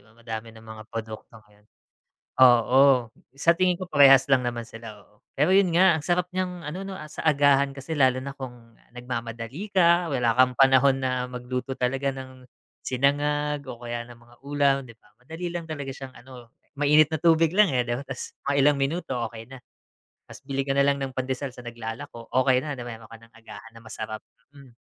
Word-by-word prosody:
Madami 110 +1 -9
ng 110 0 -15
mga 110 -1 -10
produkto 110 0 -8
ngayon. 105 0 -26 0.8
Oo, 125 0 +5 0.2
sa 165 +4 +4
tingin 180 0 +1
ko 185 - -6
parehas 140 -5 +6
lang 130 - +5
naman 120 -1 -4
sila, 115 -3 -12
oo. 105 - -30 0.2
Pero 150 +7 +2
'yun 195 -1 +5
nga, 185 -1 +6
ang - - -6
sarap 180 0 +1
niyang 180 -2 -4
ano 165 +6 -5
'no, 195 - -6
ah, 155 - -9
sa - - -8
agahan 140 -2 +3
kasi 140 +4 -7
lalo 130 -1 +3
na 140 +1 -6
kung 120 -4 -11 0.2
nagmamadali 120 - -6
ka, 175 -2 +3
wala 125 -6 +1
kang 125 0 +3
panahon 135 0 +5
na 125 -1 -1
magluto 125 +1 -5
talaga 135 +2 -1
ng 130 -1 -11 0.4
sinangag 145 +2 0
o 120 - -6
kaya 120 0 -4
ng 120 -1 -13
mga 120 0 -21
ulam, 140 -1 +2
'di 115 - -13
ba? - - -27
Madali 160 +7 -7
lang 170 -1 -5
talaga 145 -3 -5
siyang 135 -1 -10
ano, 125 -2 -13 0.3
mainit 150 +1 +4
na 160 - 0
tubig 165 -1 +3
lang, 205 0 +5
eh, 125 - +2
'di 120 - -3
ba - - -6
ta's 135 -2 -7
mga 140 - +1
ilang 145 0 +4
minuto 140 +1 -2 0.2
okey 115 0 -10
na. 135 - -10 0.7
Ta's - - -13
bili 135 -1 -2
ka 135 - +1
na 140 - +4
lang 140 0 +2
ng 135 -1 -4
pandesal 130 0 -3
sa - - -10
naglalako, 115 +1 -8
okey 130 -2 +3
na, 145 +1 -5
na 125 - -7
mayro'n 115 -2 -9
ka 115 - -11
ng 115 0 -20
agahan 115 0 -13
na 115 - -14
masarap, 110 -1 -7 0.3
hmm. 140 -2 -15
130 Hz, 200 wpm, -25 LUFS, 120-145 Hz, 0.8 s, parehas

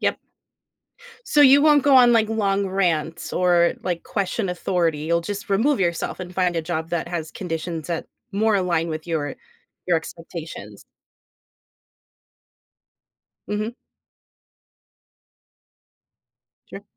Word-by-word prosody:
Yep. - - 0 1.1
So, 295 - +2
you 280 0 +7
won't 295 -3 +5
go 280 -2 +4
on, 245 -1 +7
like, 220 -2 +3
long 200 -3 0
rants 175 -4 -1
or, 175 -1 +3
like, 175 -2 -2
question 200 0 -2
authority. 175 -3 0
You'll 170 +2 +1
just 200 +4 -6
remove 245 +9 +2
yourself 170 +1 -1
and 180 0 -8
find 180 -2 +1
a 165 - 0
job 160 -1 -3
that 170 0 -2
has 165 -3 -4
conditions 165 -3 -5
that 170 -2 -3 0.3
more 215 +2 +2
align 170 -3 0
with 155 +1 -5
your 160 -3 -2 0.5
your 175 -2 +3
expectations. 160 - -9 2.6
Mhm. 215 +3 -2 3.0
Sure. - - -9
180 Hz, 115 wpm, -23 LUFS, 165-205 Hz, 3.0 s, you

